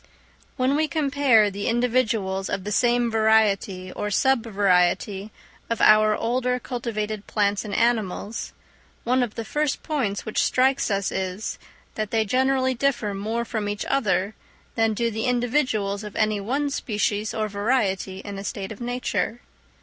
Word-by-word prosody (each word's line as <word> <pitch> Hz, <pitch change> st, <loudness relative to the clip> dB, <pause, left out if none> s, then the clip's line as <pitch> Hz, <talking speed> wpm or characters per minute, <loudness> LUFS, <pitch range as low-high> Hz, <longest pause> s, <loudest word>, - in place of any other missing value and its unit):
_ -, -, -33 dB, 0.5 s
When 260 Hz, +1 st, +2 dB
we 310 Hz, +1 st, +2 dB
compare 275 Hz, -8 st, +3 dB
the 200 Hz, +1 st, -4 dB
individuals 225 Hz, -5 st, 0 dB
of 200 Hz, -2 st, -2 dB
the 210 Hz, -, -4 dB
same 240 Hz, +1 st, +2 dB
variety 210 Hz, -4 st, +2 dB
or 210 Hz, -, -3 dB
sub 265 Hz, +3 st, +2 dB
variety 195 Hz, 0 st, +1 dB, 0.4 s
of 230 Hz, -, -1 dB
our 215 Hz, 0 st, +6 dB
older 250 Hz, +2 st, 0 dB
cultivated 215 Hz, -4 st, -4 dB
plants 205 Hz, -1 st, +1 dB
and 210 Hz, -, -6 dB
animals, 225 Hz, -2 st, 0 dB, 0.5 s
one 255 Hz, +2 st, +2 dB
of 240 Hz, -4 st, -2 dB
the 230 Hz, -, -4 dB
first 295 Hz, +4 st, -1 dB
points 250 Hz, -10 st, -2 dB
which 215 Hz, -, 0 dB
strikes 265 Hz, +1 st, +2 dB
us 200 Hz, -1 st, 0 dB
is, 190 Hz, +2 st, -3 dB, 0.3 s
that 215 Hz, -1 st, -3 dB
they 220 Hz, 0 st, +1 dB
generally 260 Hz, +3 st, +2 dB
differ 240 Hz, -5 st, 0 dB
more 220 Hz, +4 st, -2 dB
from 215 Hz, -3 st, -3 dB
each 205 Hz, 0 st, -3 dB
other 200 Hz, -7 st, +1 dB, 0.4 s
than 225 Hz, -1 st, +1 dB
do 230 Hz, +2 st, 0 dB
the 220 Hz, +1 st, -3 dB
individuals 240 Hz, -5 st, 0 dB
of 210 Hz, -1 st, -8 dB
any 215 Hz, -1 st, +1 dB
one 280 Hz, +7 st, -1 dB
species 210 Hz, -4 st, -1 dB
or 215 Hz, -1 st, -1 dB
variety 200 Hz, -3 st, -1 dB
in 200 Hz, -1 st, -7 dB
a -, -, -6 dB
state 195 Hz, -1 st, -5 dB
of 220 Hz, -, -9 dB
nature. 245 Hz, -1 st, -2 dB
220 Hz, 155 wpm, -24 LUFS, 205-250 Hz, 0.5 s, our